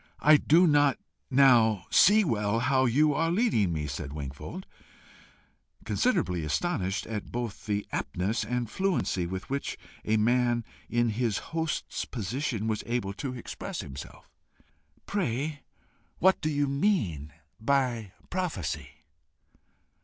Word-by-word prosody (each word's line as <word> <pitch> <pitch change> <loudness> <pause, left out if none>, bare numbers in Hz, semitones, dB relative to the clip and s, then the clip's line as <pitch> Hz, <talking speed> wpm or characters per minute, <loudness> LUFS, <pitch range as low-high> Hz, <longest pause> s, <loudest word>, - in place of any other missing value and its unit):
"I 155 0 +7
do 165 +5 +5
not 145 -4 +4 0.3
now 120 -8 +5
see 215 +3 +6
well 105 - 0
how 130 +1 +3
you 145 +5 +3
are 165 +3 +1
leading 170 - +2
me," 75 -2 -2
said 70 0 -5
Wingfold, 75 - -7 1.2
considerably 165 - +1
astonished 95 - -1
at 110 -2 -5
both 120 -4 -5
the 105 -1 -1
aptness 100 +6 -1
and 120 +2 -2
fluency 160 - 0
with 95 +2 -5
which 140 0 -2 0.3
a 110 +1 +2
man 120 +1 +2 0.2
in 120 0 +2
his 110 -1 0 0.2
host's 160 -1 -2
position 115 0 -3
was 110 -1 -1
able 115 -5 -1
to 130 +5 -5
express 120 - -6
himself. 65 0 -10 0.8
"Pray, 145 - -2 0.6
what 190 +1 +4
do 155 - 0
you 145 -1 +1
mean 135 - 0 0.3
by 120 -5 0 0.2
PROPHECY?" 175 - -3
120 Hz, 125 wpm, -28 LUFS, 105-150 Hz, 1.2 s, I